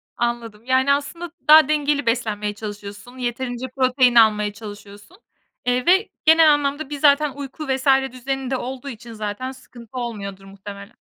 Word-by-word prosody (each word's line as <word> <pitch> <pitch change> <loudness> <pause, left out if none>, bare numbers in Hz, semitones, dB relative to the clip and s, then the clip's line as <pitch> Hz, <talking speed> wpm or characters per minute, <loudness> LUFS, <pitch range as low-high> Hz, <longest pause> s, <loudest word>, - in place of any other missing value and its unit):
Anladım, 235 -2 -3
yani, 260 +2 +3
aslında 335 +4 -4 0.2
daha 310 -1 +8
dengeli 295 -2 +1
beslenmeye 215 -3 -1
çalışıyorsun, 205 +3 -9
yeterince 245 0 -4
protein 255 -2 +3
almaya 210 -2 +4
çalışıyorsun. 205 - -12 0.5
Eee, 250 0 +1
ve 380 +5 +4 0.2
genel 320 -1 +7
anlamda 290 0 -2
bir 290 -1 -5
zaten 295 0 +4
uyku 285 +2 -7
vs. 265 0 -2 0.2
düzeni 265 +1 -4
de 260 - +1
olduğu 260 +2 -6
için 235 -1 -10
zaten 215 +4 -4
sıkıntı 255 -2 -13
olmuyordur 200 -5 -6
muhtemelen. 200 +2 -11
250 Hz, 145 wpm, -21 LUFS, 215-280 Hz, 0.5 s, daha